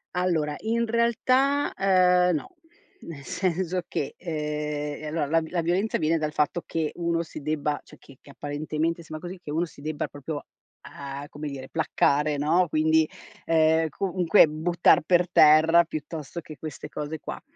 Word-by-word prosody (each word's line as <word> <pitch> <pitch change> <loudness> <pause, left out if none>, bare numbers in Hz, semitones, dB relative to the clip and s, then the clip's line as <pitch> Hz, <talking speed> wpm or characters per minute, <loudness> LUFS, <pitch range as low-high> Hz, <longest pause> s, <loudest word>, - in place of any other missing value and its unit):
Allora 160 -5 0
in 230 +1 0
realtà, 255 +5 +2
uhm, 180 -2 +4
no, 250 - -6 0.4
nel 145 -4 -10
senso 185 +1 -1
che, 140 - -3
ehm, 150 -2 -4
ehm, - - -4
allora 150 -1 -1
la 165 +3 +2
v 160 - -7
la 175 -2 -1
violenza 185 +6 0
viene 160 0 +1
dal 155 0 -2
fatto 150 +3 0
che 160 -2 -2
uno 170 -1 -1
si 155 - -9
debba 150 0 -2
cioè - - -16
che 135 -2 -18
che - - -18
apparentemente 155 +4 -3
sembra 160 +2 -8
così, 185 0 -8
che 150 - -10
uno 165 +4 0
si 140 -3 -15
debba 155 0 -3
proprio, 145 +1 -7 0.4
uhm, 140 0 -7
come 150 +1 -7
dire, 135 -2 -7
placcare, 150 -2 +1
no, 165 +5 +2
quindi, 155 0 +3 0.4
ehm, 160 0 +3
comunque 180 +1 +3
buttar 160 +3 +3
per 175 +1 +3
terra, 160 +3 +6
piuttosto 155 +1 -6
che 155 -2 -11
queste 155 -3 -7
cose 150 +1 -5
qua. - - -7
160 Hz, 165 wpm, -26 LUFS, 150-175 Hz, 0.4 s, terra